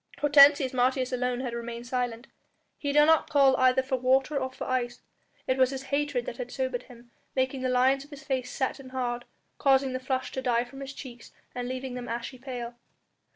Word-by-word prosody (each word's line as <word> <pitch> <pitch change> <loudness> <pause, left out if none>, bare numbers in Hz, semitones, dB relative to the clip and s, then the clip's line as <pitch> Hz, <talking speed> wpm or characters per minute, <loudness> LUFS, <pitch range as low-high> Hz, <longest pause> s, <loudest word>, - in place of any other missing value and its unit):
Hortensius 285 -2 +6
Martius 255 +1 +1
alone 250 0 -1
had 250 -3 -4
remained 235 0 -6
silent. 245 -1 -2 0.5
He 285 - -1
did 295 +1 +6
not 320 0 +4
call 275 -3 +5
either 255 0 +4
for 260 0 -1
water 265 +3 +2
or 260 -1 -1
for - - -7
ice. 245 -2 -2 0.4
It 260 0 0
was 260 -1 +5
his 270 0 -5
hatred 285 -4 0
that 235 - -6
had 245 -1 -5
sobered 260 -1 -2
him, 240 -1 -16 0.2
making 260 0 0
the 255 - 0
lines 260 +2 +3
of 290 - -17
his 290 0 -11
face 255 -2 -2
set 265 +1 -2
and 260 -1 -12
hard, 245 -2 -2 0.3
causing 270 -2 +3
the 255 - -2
flush 260 0 -2
to 260 - -4
die 240 -2 +1
from 250 +2 -12
his 275 0 -7
cheeks 245 -4 -10 0.2
and 245 0 -4
leaving 255 0 -4
them 245 -1 -6
ashy 235 +2 -5
pale. 245 -2 -6
260 Hz, 205 wpm, -28 LUFS, 245-270 Hz, 0.5 s, Hortensius